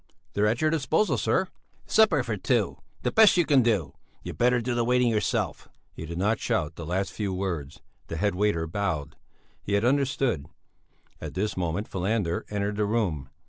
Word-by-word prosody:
"They're 105 +1 +2
at 115 +3 0
your 155 0 +3
disposal, 160 +6 +1
sir!" 190 - +1 0.4
"Supper 220 0 +4
for - - -2
two, - - 0 0.2
the - - 0
best 220 -4 +6
you 175 - +4
can 140 -4 +5
do! 100 - 0 0.3
You'd - - -7
better 125 +1 +4
do 120 +1 -2
the 120 0 +1
waiting 125 0 +3
yourself." 105 -2 -1 0.2
He 80 - -8
did 85 +1 -6
not 105 +5 +1
shout 75 +2 -1
the 85 - -7
last 95 +3 -1
few 100 -3 -2
words; 90 -7 -4 0.3
the 80 - -5
head 100 +4 +1
waiter 95 -3 +1
bowed; 80 -5 -3 0.5
he 100 - -4
had 100 +2 +2
understood. 135 - +1 0.7
At - - -7
this 105 +3 -1
moment 90 +3 -2
Falander 95 -2 -1
entered 105 0 -2
the 105 - +1
room. 95 - -1
105 Hz, 180 wpm, -26 LUFS, 90-120 Hz, 0.7 s, best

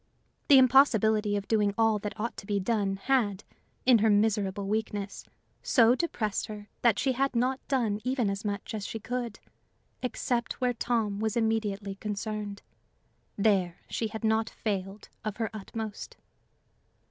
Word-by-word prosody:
The 280 - +8
impossibility 220 -5 +5
of 200 -1 -3
doing 210 -2 +2
all 225 -2 +3
that 205 +1 -6
ought 235 +2 -2
to 195 - -9
be 205 -2 +1
done, 200 -1 0
had, 210 -2 0 0.4
in 245 -3 +6
her 220 +1 +3
miserable 205 -2 +1
weakness, 210 -1 -3 0.4
so 235 -2 +5
depressed 245 -8 -1
her 210 -1 -9
that 230 -4 +4
she 270 - +1
had 270 +1 0
not 255 +3 +1
done 225 -6 0
even 255 -3 0
as 195 +1 -2
much 205 0 -4
as 210 -2 -4
she 225 - -5
could 240 0 -4 0.6
except 245 -1 -1
where 250 -1 +1
Tom 225 -4 -1
was 220 +1 -1
immediately 215 -3 0
concerned: 210 0 -5 0.7
there 195 -4 +2
she 225 - -1
had 220 +1 -7
not 220 0 +2
failed 195 -1 -4 0.2
of 215 -1 -4
her 225 -2 -2
utmost. 215 0 -6
215 Hz, 150 wpm, -29 LUFS, 205-235 Hz, 0.7 s, The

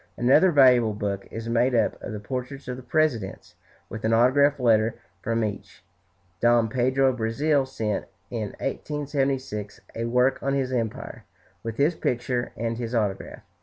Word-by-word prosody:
Another 135 +9 +5
valuable 125 -7 +5
book 100 -1 -3
is 115 +1 -6
made 120 +2 +2
up 115 -2 +2
of - - -6
the 105 - -5
portraits 130 +5 -6
of 125 - -3
the 130 - -9
presidents, 125 -8 -1 0.3
with 110 - -8
an 110 +1 +2
autograph 140 +5 +4
letter 115 -2 +3 0.3
from 115 0 0
each. 100 -3 -6 0.6
Dom 120 -1 +4
Pedro 130 +3 +2
of 130 - -3
Brazil 135 +5 +1
sent, 110 -5 -2 0.3
in 110 -4 -4
1876, 135 -7 -3
a 115 - -3
work 125 +3 +2
on 140 0 0
his 130 -2 -1
empire, 115 -4 -4 0.4
with 115 -1 -5
his 145 +5 +3
picture 125 -4 -2
and 115 +1 -2
his 120 0 -3
autograph. 105 -4 -2
120 Hz, 160 wpm, -25 LUFS, 110-135 Hz, 0.6 s, Another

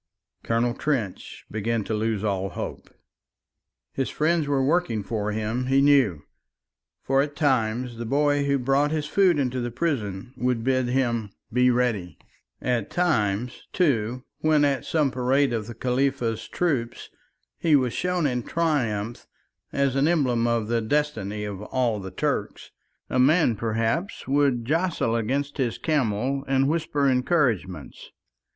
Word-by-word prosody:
Colonel 115 +1 0
Trench 120 -8 -3
began 110 +1 -1
to 110 - -4
lose 110 -1 -1
all 95 -2 -1
hope. - - -6 1.0
His 135 - -1
friends 160 0 +1
were 135 -2 +1
working 155 - +1
for 105 0 -2
him, 110 +4 -2
he 135 +1 +3
knew. 135 - +4 0.8
For 135 0 +3
at 145 0 -3
times 125 -4 0
the 120 - -5
boy 145 +2 +2
who 140 0 +2
brought 135 +3 +2
his 155 -1 -1
food 180 +2 +3
into 130 -2 0
the 120 - -2
prison 120 - -3
would 125 -2 -1
bid 130 0 +1
him 120 -4 0 0.2
be 125 +1 +4
ready; 115 -9 0 0.5
at 120 -5 0
times, 120 - 0
too, 125 - +1 0.2
when 155 -2 +3
at 135 -3 0
some 150 -4 +1
parade 130 +1 +1
of 110 -2 -2
the 120 - -8
Khalifa's 125 -2 -1
troops 130 -9 -2 0.5
he 160 -3 +4
was 130 -4 +2
shown 180 -2 0
in 125 -3 0
triumph 120 -9 -1 0.4
as 140 -2 +1
an 140 +2 +3
emblem 125 -8 +2
of 115 -2 0
the 115 0 +1
destiny 110 -5 -1
of 100 -1 -6
all 115 -1 -1
the 95 -1 -6
Turks, 90 - -3 0.4
a 125 - -1
man 140 -2 +4
perhaps 115 - -2
would 135 -4 +2
jostle 160 -5 0
against 135 +6 -1
his 120 -4 0
camel 135 -2 0
and 135 0 +2
whisper 150 -2 0
encouragements. 125 - 0
125 Hz, 145 wpm, -25 LUFS, 115-145 Hz, 1.0 s, knew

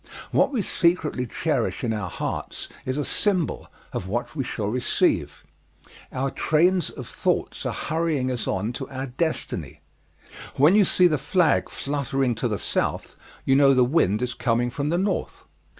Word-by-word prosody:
What - - +3
we 240 -7 0
secretly 170 -9 +1
cherish - - -1
in 115 - 0
our 105 -4 -3
hearts - - -4 0.2
is 130 +2 -1
a 145 - -1
symbol 185 -6 0 0.3
of 90 - -3
what 120 +9 -3
we 140 - -1
shall 110 -4 -3
receive. 120 +4 0 0.7
Our 135 +1 -1
trains 175 +2 +2
of - - -9
thoughts - - -1
are - - -1
hurrying 155 -5 -1
us 125 -2 -3
on 105 +6 -1
to 135 +2 -6
our 130 -1 -4
destiny. 155 +6 -3 0.7
When 150 +6 +5
you 210 -2 +6
see 180 - +4
the 155 -5 +3
flag 170 0 +2
fluttering 135 -2 -1
to 120 - 0
the 105 -3 -1
South, - - -2 0.3
you 135 - +4
know 135 -1 +6
the 125 -1 +5
wind 120 - +2
is 125 -1 -2
coming 120 0 0
from 140 +3 -2
the 170 - +1
North. 195 +3 -2
135 Hz, 165 wpm, -24 LUFS, 120-165 Hz, 0.7 s, you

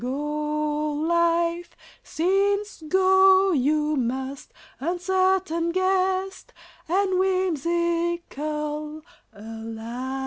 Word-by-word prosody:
Go, 300 +3 -2
life, 340 +2 0 0.3
since 395 +4 0
go 380 +2 +5
you 300 +1 +1
must, 265 +2 -3 0.3
Uncertain 360 +1 0
guest 375 +1 -1 0.3
and 375 +2 +1
whimsical 335 -4 -1 0.3
ally! 225 +3 -7
335 Hz, 65 wpm, -24 LUFS, 295-375 Hz, 0.3 s, go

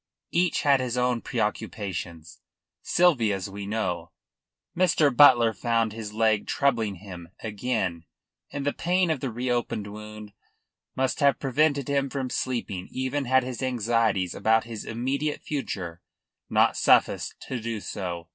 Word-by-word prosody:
Each 175 0 +1
had 140 -2 +4
his 125 -1 -2
own 125 -1 +1
preoccupations. 100 -7 -4 0.4
Sylvia's 115 - +2
we 100 0 -6
know. 90 -6 -2 0.7
Mr. 160 -6 +3
Butler 120 -5 +7
found 115 0 0
his 110 -2 -6
leg 110 -1 +1
troubling 115 -8 +1
him 90 -3 -10
again, 105 -6 -2 0.5
and 140 -1 -4
the 145 - +1
pain 180 0 +1
of 155 - -1
the 135 - -3
reopened 120 -3 -2
wound 105 0 -9 0.6
must 130 0 0
have 140 -4 +4
prevented 140 0 +1
him 140 -1 0
from 130 -2 -3
sleeping 115 -8 -3
even 130 +2 -2
had 130 +1 +3
his 125 -3 -5
anxieties 115 -7 +1
about 110 0 +2
his 115 -2 -7
immediate 135 +6 -2
future 90 - -4 0.5
not - - +3
sufficed - - +3
to 130 - -4
do 115 -1 -4
so. 85 -4 -5
115 Hz, 135 wpm, -26 LUFS, 105-135 Hz, 0.7 s, Butler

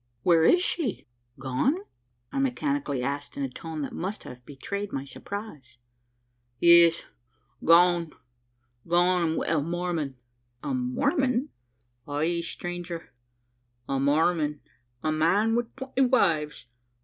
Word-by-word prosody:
"Where 170 -2 +5
is 355 - +5
she? 295 - -2 0.3
gone?" 135 - 0 0.5
I - - -2
mechanically 270 - -1
asked, 140 +2 -4
in 140 - -2
a 135 - -2
tone 160 +2 -6
that - - -5
must 195 +5 -4
have 125 0 -11
betrayed 200 +9 -5
my 135 0 -4
surprise. 140 - -8 0.8
"Yes 170 -1 +6 0.6
gone! 170 -1 +5 0.8
gone! 175 +1 +3
an' - - -3
wi' - - -2
a 160 -2 +1
Mormon!" 170 -3 -2 0.5
"A 280 - -2
Mormon?" 255 +1 0 0.6
"Ay, 160 +4 0
stranger, 175 0 -6 0.7
a 135 -1 -1
Mormon 150 +1 +1 0.4
a 155 - +1
man 190 +9 +2
wi' 240 0 +1
twenty 265 0 -2
wives! 165 - +2
170 Hz, 120 wpm, -27 LUFS, 150-215 Hz, 0.8 s, Yes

